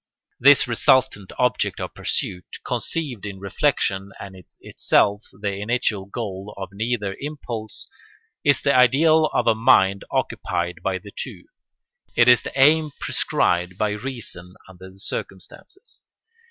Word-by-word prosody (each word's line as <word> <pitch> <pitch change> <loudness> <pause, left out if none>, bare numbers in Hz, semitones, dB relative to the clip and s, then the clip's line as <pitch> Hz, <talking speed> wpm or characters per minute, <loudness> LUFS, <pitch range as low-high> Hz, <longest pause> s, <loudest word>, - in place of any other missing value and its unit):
This 135 +1 +6
resultant 120 -3 +2
object 125 0 +1
of - - -5
pursuit, 90 -1 -3
conceived 140 -10 -3
in 100 -2 -6
reflection 100 -3 -1
and 100 -1 -9
in 90 -2 -14
itself 105 +1 +1
the 100 0 -4
initial 105 -2 -1
goal 100 -2 -6
of 95 -2 -6
neither 105 -1 -2
impulse, 120 -7 -5 0.6
is 145 -1 +3
the 140 - +3
ideal 155 +6 +5
of 120 - 0
a 115 - +5
mind 105 -4 +3
occupied 85 -1 -2
by 95 +1 -1
the 100 +2 -13
two: - - -7 0.7
it 120 - +5
is 125 -1 +7
the 135 - -6
aim 155 +3 +5
prescribed 90 +1 0
by 105 0 0
reason 105 -6 -7
under 95 0 -13
the 95 - -18
circumstances. 390 - -7
105 Hz, 135 wpm, -22 LUFS, 95-130 Hz, 0.7 s, is